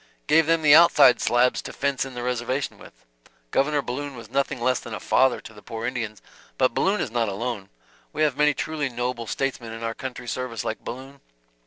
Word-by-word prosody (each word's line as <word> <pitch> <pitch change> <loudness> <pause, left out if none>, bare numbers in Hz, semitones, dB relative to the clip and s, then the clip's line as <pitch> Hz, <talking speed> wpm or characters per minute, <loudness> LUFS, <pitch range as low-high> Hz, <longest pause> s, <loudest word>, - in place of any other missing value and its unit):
"Gave 155 +1 +4
them 165 -1 +2
the 145 -1 +7
outside 150 -6 +7
slabs 120 +1 +2
to - - -8
fence 140 -1 -1
in 135 -2 -9
the 120 - -4
reservation 125 +2 -2
with. - - -16 0.5
Governor 145 +1 +1
Balloon 140 +3 -5
was 115 -3 -11
nothing 140 -2 0
less 125 +1 +1
than 115 - -7
a - - -6
father 130 -1 +3
to 110 - -12
the 105 - -14
poor 115 +1 -6
Indians. 115 -4 -4 0.3
But 130 -2 +2
Balloon 200 - +1
is 120 - -3
not 115 -2 0
alone, 100 -1 -4 0.4
we 155 - 0
have 150 -4 +2
many 150 0 +3
truly 155 -3 -2
noble 120 -1 -3
statesmen 125 -3 -3
in 115 0 -7
our 115 0 -2
country's 125 -1 -6
service 125 -3 -4
like 110 - -3
Balloon. 135 +3 -8
125 Hz, 205 wpm, -24 LUFS, 115-140 Hz, 0.5 s, the